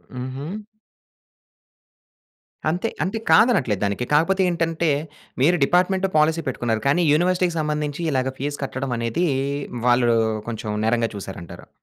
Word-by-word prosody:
హుహు. 130 +3 -5 2.2
అంతే 180 +8 -1
అంటే 195 +6 -2
కాదనట్లేదు 140 - +4
దానికి 100 +5 -2
కాకపోతే 190 +6 +3
ఏంటంటే 165 -1 0 0.5
మీరు 170 +6 +4
డిపార్ట్మెంట్ 185 +4 +2
పాలిసీ 160 +2 +3
పెట్టుకున్నారు 115 -4 -1
కానీ 160 +6 +3
యూనివర్సిటీ‌కి 180 +1 +1
సంబంధించి 150 0 -2
ఇలా‌గా 130 -1 0
ఫీజ్ 145 +2 -3
కట్టడం 130 -1 -3
అనేది 115 +9 -1 0.6
వాళ్ళు 120 -1 +4 0.4
కొంచెం 110 -2 -4
నేరంగా 115 0 +1
చూసారంటారు. 95 -4 -9
145 Hz, 110 wpm, -22 LUFS, 120-175 Hz, 2.2 s, కాదనట్లేదు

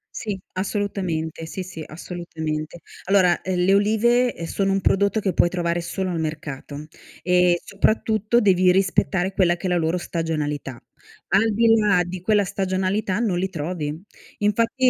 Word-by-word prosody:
Sì, 210 -4 -3 0.2
assolutamente. 185 -5 -3
Sì, 185 +3 -6
sì, 175 -3 -8
assolutamente. 160 -2 -5 0.3
Allora, 185 -2 +3
ehm, 185 -1 -2
le 190 +2 +3
olive, 235 +4 +3
ehm, 165 - -6
sono 195 +3 -1
un 195 0 +1
prodotto 200 +3 +2
che 195 -3 -1
puoi 175 - +3
trovare 170 -1 -1
solo 185 +2 -3
al 170 -2 -2
mercato, 150 -2 -5 0.4
e 180 -1 +3
soprattutto 215 +2 +1
devi 185 -2 +4
rispettare 190 0 +1
quella 175 -3 +3
che 185 +2 -5
è - - 0
la 175 - +2
loro 165 +2 0
stagionalità. 150 -7 -3 0.5
Al 215 +2 +3
di 230 +2 +3
là 205 -4 +3
di 180 +1 -6
quella 210 +1 +3
stagionalità 190 +2 -1
non 200 -7 0
li 190 +1 -1
trovi. 155 -2 -4 0.4
Infatti 230 +5 +2
185 Hz, 155 wpm, -23 LUFS, 170-200 Hz, 0.5 s, devi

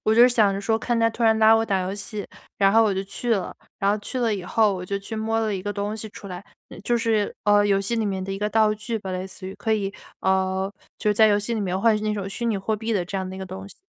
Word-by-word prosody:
我 220 - +3
就 240 +2 +8
想 215 -5 +3
着 195 - -2
说 220 +2 +1
看 240 +1 -1
他 230 0 +3
突 230 - -5
然 220 -1 +4
拉 220 0 +7
我 225 0 +2
打 195 -3 +1
游 185 +2 -3
戏， 205 0 -6 0.3
然 195 -1 +4
后 225 +1 +6
我 210 -3 +2
就 190 - -1
去 230 +4 -1
了。 190 -3 -3 0.2
然 200 0 +2
后 210 - +1
去 255 +5 -5
了 230 -3 +1
以 190 - -5
后 215 +3 +2
我 180 - -5
就 200 +1 -2
去 200 +3 -7
摸 220 +1 -1
了 220 -2 0
一 190 - -3
个 205 +2 -4
东 205 +1 -3
西 220 0 -6
出 200 -1 -11
来， 180 +1 -7 0.3
嗯， 180 - -10
就 240 +3 +1
是， 220 -3 0
呃， 205 0 +5
游 195 -1 +3
戏 200 +4 -1
里 225 -2 0
面 190 -1 -2
的 195 - -4
一 195 - -4
个 210 +1 0
道 215 -1 +3
具 220 +1 -4
吧， 195 -2 -6
类 185 +1 -3
似 190 0 -10
于。 190 - -6
可 220 - -3
以 200 -2 -2 0.3
呃， 190 +1 0 0.2
就 210 - 0
是 210 - +1
在 220 +1 +6
游 205 -1 +4
戏 210 +3 -3
里 225 - -1
面 185 -2 -1
换 225 +2 +4
取 210 - -2
那 215 0 0
种 200 -2 -4
虚 235 +4 -4
拟 220 -3 +1
货 205 +3 -1
币 220 +2 -4
的 195 -5 +1
这 195 +2 -4
样 190 - -3
的 190 - -7
一 - - -8
个 190 - -5
东 190 +1 -8
西。 - - -14
205 Hz, 345 characters per minute, -24 LUFS, 195-220 Hz, 0.3 s, 就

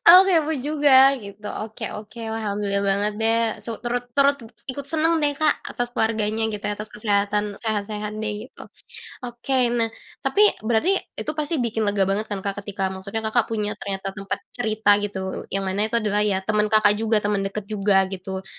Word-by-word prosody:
aku 360 +2 +12
kepo 320 -3 +3
juga 290 +1 +2 0.3
gitu. 200 +1 -11 0.2
Oke 220 0 -6
oke, 210 +3 -9 0.2
alhamdulillah 205 -2 -1
banget 205 +2 +1
deh 225 +1 +3 0.3
su 235 - -5
turut 245 +1 -2
turut 280 0 +5 0.4
ikut 280 +2 -7
seneng 325 +1 +2
deh, 290 -1 +1
Kak, 305 0 +4 0.2
atas 245 0 -3
keluarganya 220 -1 0
gitu, 210 - -6
atas 210 +1 -3
kesehatan, 205 -1 -1
sehat-sehat 210 -1 -2
deh. 215 +2 -4
Ok - - -12 0.5
oke, 240 +2 -3 0.2
nah 230 -1 +2 0.4
tapi 410 - +1 0.3
berarti 235 - +3 0.3
itu 305 - -2
pasti 300 +2 0
bikin 225 -1 -1
lega 200 -1 +2
banget 210 +2 -1
kan, 200 -2 -4
Kak, 200 0 -2
ketika 200 -1 -5
maksudnya 200 +4 -4
Kakak 240 -2 +3
punya 210 -2 -1
ternyata 195 -1 -4
tempat 195 0 -4 0.2
cerita 220 -3 +1
gitu, 205 -1 -3 0.3
yang 195 +1 -2
mana 190 +1 -1
itu 235 - 0
adalah 210 -2 +1
ya 210 -2 +2
temen 215 0 +1
Kakak 215 -1 +5
juga, 225 0 +2
temen 205 -1 +1
deket 210 +1 -5
juga 200 -2 +2
gitu 190 0 -5
215 Hz, 180 wpm, -23 LUFS, 200-235 Hz, 0.5 s, aku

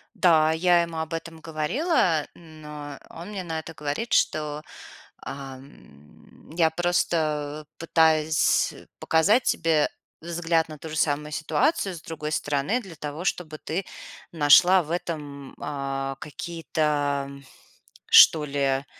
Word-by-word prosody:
Да, 165 -5 +4
я 175 +2 +3
ему 170 -1 -4
об 160 0 -4
этом 165 0 -6
говорила, 160 - 0
но 150 -3 -10
он 170 +4 -9
мне 200 -3 -5
на 165 -2 -4
это 165 +1 -9
говорит, 150 +10 -4
что: 150 -1 +1 0.6
"Ам, 130 - -12
я 165 0 +3
просто 155 -3 -1
пытаюсь 160 -1 +2 0.3
показать 200 +10 +3
тебе 160 -2 +2 0.3
взгляд 165 -1 0
на 155 - -8
ту 160 - -8
же 155 - -6
самую 150 -1 0
ситуацию 195 - 0
с 160 - -10
другой 155 -2 -6
стороны 145 - 0
для 190 -7 -11
того, 150 +3 -6
чтобы 160 -4 -2
ты 175 +5 -4 0.5
нашла 170 +4 +6
в 160 -1 -8
этом, 145 -5 -5
а, 135 -1 -4
какие-то, 150 -3 -2 0.8
что 155 -2 +8
ли, 140 -1 0
155 Hz, 125 wpm, -25 LUFS, 145-170 Hz, 0.8 s, что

